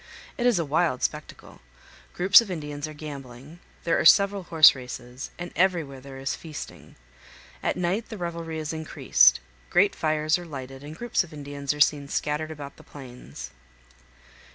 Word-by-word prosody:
It 245 - +1
is 240 -5 +3
a 165 - 0
wild 150 -2 0
spectacle; - - -5 0.5
groups 190 +5 +7
of 225 - -8
Indians 150 -4 -5
are 155 - -9
gambling, 140 0 -10 0.2
there 165 - +1
are - - +1
several 200 +4 +5
horse 160 -2 +7
races, 125 0 -8
and 175 0 -6
everywhere 165 -8 0
there 135 0 -10
is 135 0 -3
feasting. 155 -3 -10 0.7
At - - -1
night 180 +6 -1
the 220 - -7
revelry 170 -2 -5
is 155 0 -4
increased; 65 - +3 0.3
great - - +4
fires 155 +2 +1
are 175 - -9
lighted, 135 -2 -8
and 150 +2 -9
groups 240 -2 0
of 170 -2 -14
Indians 140 -1 -4
are 150 - -5
seen 145 -1 +3
scattered 150 +2 -2
about 145 -3 -9
the - - -15
plains. 120 - -11
155 Hz, 165 wpm, -26 LUFS, 140-170 Hz, 0.7 s, groups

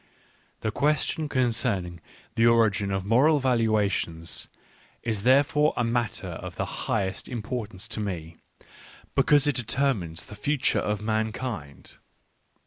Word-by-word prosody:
The 110 - -1
question 150 +3 0
concerning 115 - 0 0.3
the 115 +1 +4
origin 105 -4 +3
of 95 -1 -2
moral 135 +9 +4
valuations 110 - 0 0.5
is 110 -4 -1
therefore 145 +5 +4
a 120 - +2
matter 120 -1 -1
of - - -7
the - - -2
highest 95 -3 -2
importance 110 -3 -5
to 115 - -3
me 85 -5 -4 0.8
because 145 -1 +4
it 145 - +2
determines 115 -9 -1
the - - -11
future 135 +6 +1
of 105 0 -2
mankind. 110 - -3
115 Hz, 120 wpm, -26 LUFS, 100-130 Hz, 0.8 s, the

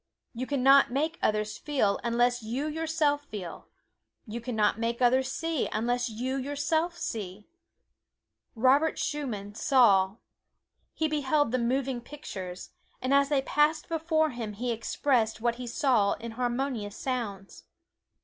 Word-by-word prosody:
You 255 +2 -4
can 280 -3 -1
not 275 +1 +7
make 310 +7 -1
others 215 0 0
feel 260 -9 +1
unless 240 +1 +2
you 240 +6 -3
yourself 310 -2 0
feel; 195 - -8 0.6
you 235 +1 -6
can 245 0 -4
not 210 0 +2
make 235 +1 -1
others 260 +1 +3
see 325 -2 -1
unless 245 +3 0
you 250 +5 -3
yourself 290 +5 -1
see. 205 -2 -5 1.1
Robert 270 +7 +3
Schumann 220 -9 -3
saw. 205 -7 +4 0.8
He 315 - +1
beheld 290 -2 +1
the 255 - +1
moving 255 +1 0
pictures, 190 -10 -8 0.3
and 255 +2 0
as 280 0 +4
they 280 -3 +2
passed 300 +3 +2
before 320 -1 +1
him 230 -4 -5
he 240 +4 -2
expressed 230 0 0
what 235 +1 0
he 250 -1 -6
saw 235 -5 +2
in 235 0 -7
harmonious 240 -3 -2
sounds. 215 -7 -4
250 Hz, 140 wpm, -28 LUFS, 225-285 Hz, 1.1 s, not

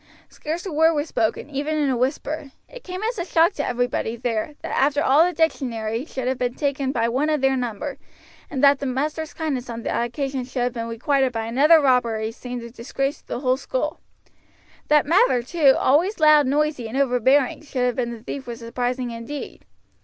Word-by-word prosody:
Scarce 330 +5 -5
a 380 - -4
word 320 +2 +3
was 295 +1 -1
spoken, 220 +4 -1
even 295 +3 -2
in 295 -2 +1
a - - +1
whisper. 275 +3 -2 0.2
It - - -12
came 370 +2 -6
as 455 -1 -2
a - - 0
shock 340 +1 +3
to 290 - -3
everybody 245 -2 -1
there, 235 +3 -3
that - - -3
after 285 +2 +2
all 285 +5 +5
the 355 - +1
dictionary 245 -8 -1
should 260 -5 -5
have 260 0 -1
been 245 0 -1
taken 280 -2 -1
by 230 -4 0
one 265 +6 0
of 305 -1 +1
their 270 0 +3
number, 250 +2 -4 0.5
and 275 -2 -3
that 280 -1 +6
the 280 - -3
master's 300 +5 -2
kindness 275 -6 -3
on 230 -1 -6
that - - -1
occasion 265 +2 -3
should 250 0 -3
have 245 0 -1
been 230 -1 -4
requited 260 +3 +1
by 225 -2 -3
another 290 +8 +5
robbery 235 -5 +1
seemed 245 0 -7
a 235 - -9
disgrace 275 +4 -3
to - - -42
the 245 - -4
whole 255 -1 +2
school. - - -3 0.9
That 300 -1 +4
Mather, 330 - +3
too, 280 0 +4
always 340 +10 +2
loud, 305 -2 +6
noisy, 290 -3 0
and 230 +4 -5
overbearing, 260 0 +2
should 265 -4 -2
have 245 -2 0
been 245 -2 -1
the 230 -2 -8
thief 265 +1 -6
was 235 -1 -5
surprising 245 +1 -3
indeed. 230 +5 -7
270 Hz, 205 wpm, -23 LUFS, 245-300 Hz, 0.9 s, that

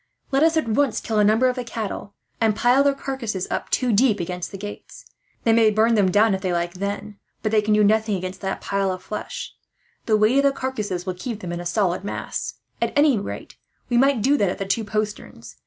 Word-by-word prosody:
Let 270 +1 +2
us 325 0 +4
at 315 - 0
once 240 +2 +1
kill 220 -2 -1
a - - +5
number 220 +5 +4
of 250 - 0
the 250 - -3
cattle, 220 -3 -5 0.3
and 220 -2 +3
pile 245 +5 +4
their 280 -1 +2
carcasses 240 -9 -4
up, - - -3
two 250 -3 +1
deep, 215 0 +3
against 180 +1 -4
the 195 - -7
gates. 205 +1 -9 0.4
They 225 - +4
may 225 -1 +5
burn 220 +2 +3
them 205 -4 +3
down 210 +3 +4
if 190 - -2
they 185 -2 -1
like, 175 0 -1
then, 200 +2 -5 0.2
but 215 - 0
they 215 -1 +4
can 210 0 +2
do 210 - +4
nothing 215 0 +2
against 185 0 -5
that 195 0 -3
pile 195 -1 0
of 185 0 -6
flesh; 210 - -6 0.5
the 215 -2 +4
weight 215 +5 +3
of - - +3
the 280 -1 +3
carcasses 210 -9 -3
will 185 - -2
keep 215 +4 -6
them 175 - -5
in 175 - -4
a 175 - -4
solid 190 -2 0
mass. 205 - -4 0.3
At - - 0
any 290 -6 +4
rate, 200 - -7 0.3
we 240 - +2
might 270 -4 +3
do 280 +4 +4
that 200 -6 +2
at - - -3
the 195 - -3
two 195 +4 0
posterns. 215 0 -5
215 Hz, 235 wpm, -23 LUFS, 195-240 Hz, 0.5 s, a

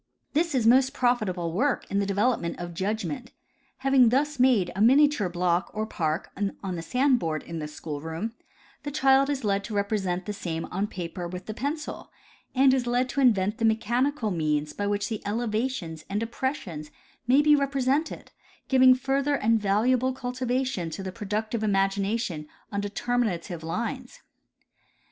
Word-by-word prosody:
This 325 0 +1
is 240 -4 +1
most 260 +3 +5
profitable 210 -9 0
work 260 +8 +1
in 200 - +1
the 200 - 0
development 200 -3 0
of 175 0 -6
judgment. 220 - -3 0.5
Having 265 -3 +6
thus 285 +3 0
made 235 -9 +4
a 195 - -1
miniature 265 -3 +5
block 175 0 0
or 215 0 -1
park 160 -6 -2 0.3
on 190 -2 -3
the 165 - -4
sand 255 - +2
board 160 -4 -2
in 165 -1 -6
the 150 - -4
school 150 -1 -6
room, 165 +8 -4 0.5
the 290 - -4
child 275 -1 +4
is 275 -3 -2
led 200 -1 +1
to 220 - -5
represent 195 -3 -1
the 210 - -3
same 170 -5 -4
on 195 +3 -1
paper 175 -2 -5
with 180 +1 -7
the 215 - -5
pencil, 290 +6 -4 0.4
and 265 0 +5
is 255 -2 0
led 245 +1 +1
to 280 - -1
invent 210 -5 +3
the - - -2
mechanical 230 +3 +1
means 150 -3 -1
by 205 - -2
which 205 0 0
the 220 -3 -4
elevations 215 -6 -2
and 200 +1 -1
depressions 225 - -4 0.4
may 270 +4 +5
be 300 0 +6
represented, 275 +2 -1 0.4
giving 260 -1 +7
fur 270 +2 0
ther 290 +1 +1
and 225 -3 +2
valuable 245 +6 +2
cultivation 250 -6 -2
to 190 +4 -6
the 190 - -4
productive 215 +3 -3
imagination 195 -3 0 0.2
on 200 -1 -1
determinative 205 -5 -2
lines. 235 +9 -4
220 Hz, 165 wpm, -26 LUFS, 185-260 Hz, 0.5 s, giving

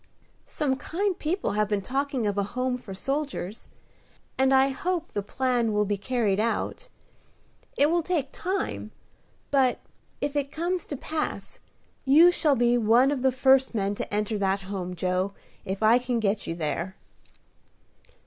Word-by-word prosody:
"Some 270 -3 -1
kind 380 +7 -1
people 345 +5 -1
have 210 +1 +1
been 205 -2 0
talking 270 -1 -1
of 205 -1 0
a 200 - +1 0.2
home 255 0 +1
for 245 -5 -9
soldiers, 270 -2 -4 0.7
and 265 0 +3
I 265 0 +5
hope 340 +5 -2
the 205 - -2
plan 240 +1 0
will 210 0 +2
be 205 +1 0
carried 210 -1 0
out. 230 - -1 0.9
It 285 - +5
will 345 0 +2
take 310 -5 -1
time; 380 +2 -3 0.6
but, 265 -3 +3 0.4
if 285 0 -2
it 280 -1 -1
comes 350 +2 -2
to 285 - -4
pass, 310 +4 -4 0.4
you 315 +6 +7
shall 305 -5 +2
be 240 0 +3
one 235 +5 +4
of 280 -3 -2
the 265 0 +3
first 265 0 +3
men 200 -1 0
to - - -5
enter 210 +1 -1
that 195 0 +1
home, 185 -2 -5
Joe, 185 +2 -1 0.3
if 195 +3 -3
I 225 +3 +6
can 245 -1 -1
get 210 -1 -1
you 165 - -2
there." 170 +3 -3
250 Hz, 160 wpm, -26 LUFS, 205-285 Hz, 0.9 s, you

